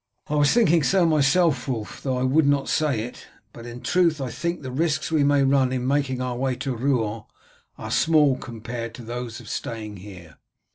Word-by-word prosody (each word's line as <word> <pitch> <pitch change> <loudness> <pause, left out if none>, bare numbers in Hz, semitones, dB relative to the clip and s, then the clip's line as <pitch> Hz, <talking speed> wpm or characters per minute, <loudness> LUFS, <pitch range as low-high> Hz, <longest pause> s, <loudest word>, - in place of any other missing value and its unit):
"I - - -2
was 145 -1 +3
thinking 185 -9 +4
so 185 +4 +3
myself, 150 -2 +2
Wulf, 110 -6 -4
though 130 -2 -1
I 125 - -1
would 140 +3 +3
not 140 -1 +2
say 145 -8 +1
it; 120 +2 -8 0.3
but 120 0 -10
in 120 +1 -8
truth 170 -4 +2
I 130 -3 -4
think 170 +3 -3
the 130 - -5
risks 155 +4 -1
we 155 -3 +3
may 140 -1 +3
run 135 -1 +3
in 125 -1 -2
making 135 -2 0
our 125 -1 -3
way 130 +1 -1
to 130 0 -3
Rouen 115 -4 -1 0.5
are - - -7
small 150 -4 +4
compared 120 -1 -7
to 125 - -10
those 120 0 -6
of - - -13
staying 110 -2 -5
here." 90 -4 -12
130 Hz, 200 wpm, -24 LUFS, 120-150 Hz, 0.5 s, thinking